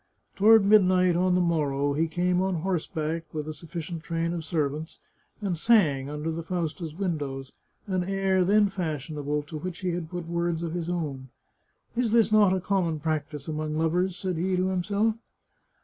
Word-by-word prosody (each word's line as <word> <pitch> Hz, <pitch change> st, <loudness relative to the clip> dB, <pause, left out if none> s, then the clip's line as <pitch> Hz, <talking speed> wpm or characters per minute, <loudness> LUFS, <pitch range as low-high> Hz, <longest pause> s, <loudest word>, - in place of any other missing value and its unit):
Toward 215 Hz, +1 st, +6 dB
midnight 185 Hz, -3 st, +5 dB
on 180 Hz, +1 st, +2 dB
the 180 Hz, -, +3 dB
morrow, 145 Hz, -4 st, +1 dB
he 160 Hz, +3 st, +1 dB
came 180 Hz, +2 st, +1 dB
on 190 Hz, -1 st, 0 dB
horseback, 165 Hz, -3 st, -2 dB
with 155 Hz, -1 st, -4 dB
a 155 Hz, -, -4 dB
suf 155 Hz, +2 st, -13 dB
ficient 165 Hz, 0 st, -5 dB
train 165 Hz, 0 st, -2 dB
of 170 Hz, -2 st, -4 dB
servants, 155 Hz, -1 st, -2 dB, 0.4 s
and 195 Hz, -4 st, -1 dB
sang, 155 Hz, -, +3 dB
under 150 Hz, +2 st, -3 dB
the 165 Hz, +1 st, -4 dB
Fausta's 165 Hz, -2 st, -3 dB
win 180 Hz, -4 st, -1 dB
dows, 135 Hz, -2 st, -6 dB, 0.3 s
an 185 Hz, -2 st, -1 dB
air 195 Hz, -1 st, +1 dB
then 205 Hz, +3 st, +4 dB
fashionable, 150 Hz, -5 st, -3 dB
to 155 Hz, +1 st, -7 dB
which 180 Hz, +2 st, -6 dB
he 185 Hz, -1 st, 0 dB
had 170 Hz, -2 st, -4 dB
put 175 Hz, -1 st, -5 dB
words 170 Hz, -1 st, -1 dB
of 165 Hz, -1 st, -3 dB
his 175 Hz, -1 st, -3 dB
own. 145 Hz, -7 st, -3 dB, 0.3 s
" -, -, -42 dB
Is 235 Hz, -2 st, +1 dB, 0.2 s
not 210 Hz, -2 st, +6 dB
this 190 Hz, -, +2 dB
a 180 Hz, -, -7 dB
common 175 Hz, -6 st, 0 dB
practice 150 Hz, -2 st, -3 dB
among 155 Hz, 0 st, -3 dB
lovers?" 175 Hz, +3 st, +1 dB
said 185 Hz, -3 st, -3 dB
he 185 Hz, +3 st, 0 dB
to 185 Hz, +1 st, +1 dB
himself. 205 Hz, +4 st, 0 dB
170 Hz, 185 wpm, -27 LUFS, 155-185 Hz, 0.4 s, Toward